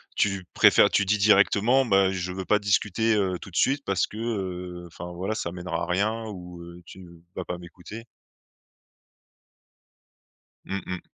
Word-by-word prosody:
Tu 100 -2 0
préfères - - +6
tu - - +2
dis 105 +3 +2
directement: 105 +5 +4
«Ben, 95 -4 +3
je 90 -1 -3
veux 95 0 -5
pas 105 - +3
discuter, 105 +2 +1
heu, 95 -3 0
tout - - -9
de - - -14
suite 140 +1 +2
parce 100 -2 0
que, 105 - -11
heu, 90 -6 -4
enfin 85 +1 -9
voilà 95 +5 -3
ça 85 - -3
mènera 90 -1 -4
à - - -1
rien 110 +5 0
ou, 90 -4 -9
heu, 85 +1 -11
tu 95 -1 -12 0.3
vas 95 - -4
pas 90 - -4
m'écouter»? 90 +6 -11 2.6
Mmh 95 -1 -4
mh. 90 -1 -5
95 Hz, 165 wpm, -25 LUFS, 90-105 Hz, 2.6 s, préfères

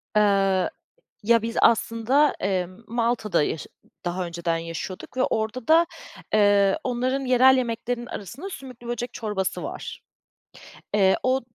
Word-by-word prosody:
Iıı, 195 -3 +3 0.5
ya, 230 +1 +4
biz, 230 +1 -4
aslında, 235 +6 +3
emm, 185 -1 -2
Malta'da 230 -5 0
yaşı 150 - -3 0.4
daha 175 +1 -2
önceden 170 0 -2
yaşıyorduk 165 +6 -7
ve 255 - +2
orada 220 +2 -2
da, 330 +2 +6 0.5
eee, 205 -2 +4
onların 255 +2 0
yerel 260 +1 +6
yemeklerinin 240 0 -2
arasında 270 - -7
sümüklü 255 -7 -10
böcek 240 0 -3
çorbası 205 -4 -3
var. - - -6 0.9
Eee, 190 -2 +4
o 260 +1 +2
225 Hz, 125 wpm, -24 LUFS, 195-250 Hz, 0.9 s, da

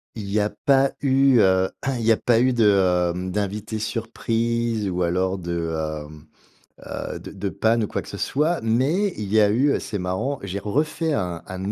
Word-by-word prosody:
il 105 -3 -6
y 105 +1 +1
a 105 - 0 0.2
pas 135 -1 +4
eu, 135 -2 +4
heu, 95 -2 +3 0.3
il - - -4
y 115 0 +3
a 110 - +4
pas 120 -1 +2
eu 130 +1 +3
de, 120 -3 +2 0.5
heu, 90 +1 -4
d'invités 105 +2 -3
surprise, 115 0 -1
ou 90 0 -1
alors 95 +2 0
de, 85 -2 -3 0.3
hem, 75 0 -13 0.6
heu, - - -5
de - - -10
de 100 0 -4
panne 110 +4 +1
ou 105 - -1
quoi - - -3
que - - -15
ce - - -7
soit, 155 +3 0
mais 140 - +1
il 105 - -4
y 110 - +6
a 105 - +4
eu, 130 +7 +3
heu, - - 0
c'est 105 - -4
marrant: 100 +10 -2
j'ai 100 +1 -4
refait 150 - -1
un 90 - -2
un 95 +2 -4
110 Hz, 205 wpm, -23 LUFS, 95-125 Hz, 0.6 s, y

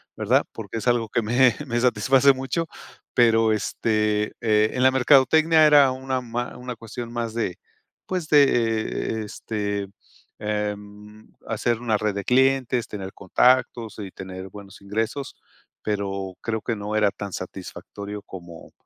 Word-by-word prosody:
¿verdad? - - +2
Porque - - -6
es 115 - -4
algo 120 -2 +2
que 120 - 0
me 120 +3 +4
me 120 -2 -1
satisface 130 +3 +4
mucho, 135 +6 -3 0.5
pero, 115 -2 +4
este, 105 -1 0
eh, 110 -1 +3
en 125 - +1
la 130 - +6
mercadotecnia 150 +5 +5
era 145 -3 +6
una 130 0 -3
ma 120 0 -4
una 125 0 -6
cuestión 115 +1 -7
más 120 -2 -3
de, 110 -6 -2 0.5
pues, 180 -4 -3
de, 145 -2 +7
e 115 -3 0
e - - -4
este, 100 -2 -4 0.5
em, 105 0 -5 0.2
hacer 115 +1 -1
una 115 -3 +1
red 105 -1 -1
de 100 - -3
clientes, 130 0 +2
tener 95 -2 -6
contactos 115 +2 +2
y 100 -2 -6
tener 95 0 -8
buenos 100 0 -12
ingresos, 110 +7 -3 0.5
pero 100 -3 -3
creo 110 -1 -2
que 115 - -2
no 105 +1 -4
era 105 -2 +3
tan 100 0 -7
satisfactorio 100 +2 -7
como 85 -4 -11
110 Hz, 150 wpm, -24 LUFS, 105-125 Hz, 0.5 s, de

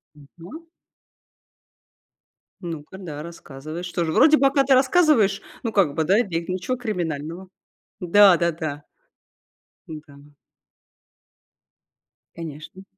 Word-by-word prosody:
Мгм. 175 - -14 1.9
Ну-ка, 165 0 -8
да, 150 -6 -7
рассказывай. 155 0 -9
Что 175 -1 -3
же, 160 - -2
вроде 310 - +5
пока 275 0 +3
ты 270 0 +3
рассказываешь, 260 - +3 0.2
но 230 - -2
как 185 -9 +1
бы, 160 - 0
да, 190 +7 +3
и - - +3
бег 170 -5 -4
ничего 185 +8 -3
криминального. 175 -6 -5 0.5
Да-да-да. 170 -6 +3 1.0
Да. 145 -2 -12 2.0
Конечно. 165 +3 -9
175 Hz, 95 wpm, -22 LUFS, 155-210 Hz, 2.0 s, вроде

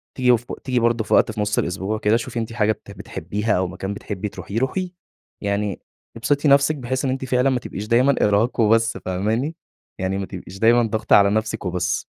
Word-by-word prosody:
تيجي 125 -2 +4
ف 120 - -15 0.2
تيجي 125 -2 0
برضه 115 -1 +1
في - - -2
وقت - - +4
في 110 -1 -4
نص 105 0 0
الأسبوع 95 +4 -2
كده، 110 +1 +3
شوفي 120 +1 -4
أنتِ 115 0 -4
حاجة 110 -2 +2
بت 100 - -8
بتحبيها 100 +1 -2
أو 95 0 0
مكان 95 +2 -5
بتحبي 105 0 -5
تروحيه، 95 +5 -5
روحيه، 180 +8 -1 0.5
يعني 100 -1 -2 0.4
ابسطي 145 +6 +1
نفسِك، 140 +2 +5
بحيث 130 0 -3
إن 130 - +1
أنتِ 130 0 -3
فعلًا 125 +1 +2
ما 130 -1 +1
تبقيش 105 -1 -7
دايمًا 130 +4 +4
إرهاق 105 +4 +2
وبس، 115 +1 +3
فاهماني؟ 110 - -2 0.4
يعني 95 +1 -1
ما 100 - -3
تبقيش 95 0 -9
دايمًا 120 +1 +5
ضاغطة 110 -1 +2
على 100 -1 +6
نفسِك 110 0 -1
وبس. 90 0 -1
110 Hz, 200 wpm, -22 LUFS, 100-125 Hz, 0.5 s, على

